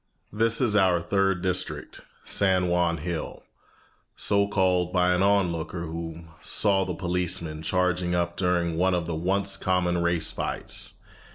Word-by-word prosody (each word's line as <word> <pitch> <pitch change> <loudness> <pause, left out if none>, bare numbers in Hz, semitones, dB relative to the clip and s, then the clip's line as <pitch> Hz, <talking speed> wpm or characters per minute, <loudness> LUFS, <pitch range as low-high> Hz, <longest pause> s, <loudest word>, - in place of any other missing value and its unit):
This 115 +1 +1
is 115 -5 +1
our 95 -4 +4
third 95 +1 0
district, 90 -1 -2 0.2
San 95 -2 +2
Juan 85 -1 +1
Hill, 85 +1 -5 0.7
so 100 0 +2
called 90 -3 +1
by 90 0 +2
an 90 - +1
on 100 -2 +3
looker 85 +1 -5
who 80 0 -6 0.2
saw 100 -2 +2
the 90 -2 -4
policemen 85 -3 -1
charging 90 +1 0
up 85 0 -1
during 85 -3 0
one 95 +1 +2
of 85 -2 -2
the 85 - -4
once 95 +4 +1
common 90 -2 0
race 85 -1 +1
fights. - - -3
90 Hz, 150 wpm, -26 LUFS, 85-95 Hz, 0.7 s, our